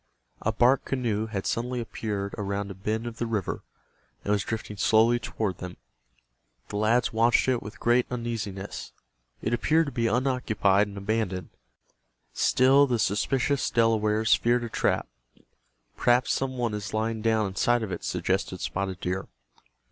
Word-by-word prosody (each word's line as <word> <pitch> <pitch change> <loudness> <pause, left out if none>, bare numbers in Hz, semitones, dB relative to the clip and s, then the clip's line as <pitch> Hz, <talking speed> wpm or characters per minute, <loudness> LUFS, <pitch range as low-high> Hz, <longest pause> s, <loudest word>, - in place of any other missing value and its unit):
A - - +1
bark 125 +2 +3
canoe 115 -5 -1
had 100 -3 -4
suddenly 125 +2 -1
appeared 105 -3 -4
around 100 0 -3
a - - -5
bend 110 +4 -3
of 120 -1 -6
the 120 - -1
river, 105 -5 -2 0.6
and 100 - -1
was 105 -2 +2
drifting 110 -2 -4
slowly 115 +4 +4
toward 110 -5 -3
them. 90 -1 -7 0.9
The 105 - -3
lads 115 +4 +2
watched 115 +3 +3
it 125 -2 +2
with 105 +2 -9
great 120 +1 +3
uneasiness. 110 -5 -5 0.5
It 110 - 0
appeared 160 +7 +3
to 140 - -5
be 120 -2 0
unoccupied 115 -5 +2
and 100 0 -9
abandoned. 100 -3 -2 0.8
Still 135 +2 +4
the 125 -2 +1
suspicious 130 +6 +1
Delawares 110 -1 +3
feared 120 +1 +2
a 120 - -4
trap. - - 0 0.9
"Perhaps 125 +1 +3
some 130 -1 -2
one 120 -3 -1
is 105 +1 -4
lying 110 0 -1
down 110 -1 +2
inside 115 +5 +1
of 105 - -4
it," - - -5
suggested - - -1
Spotted 95 -1 -3
Deer. 90 +1 -2
110 Hz, 155 wpm, -27 LUFS, 105-120 Hz, 0.9 s, slowly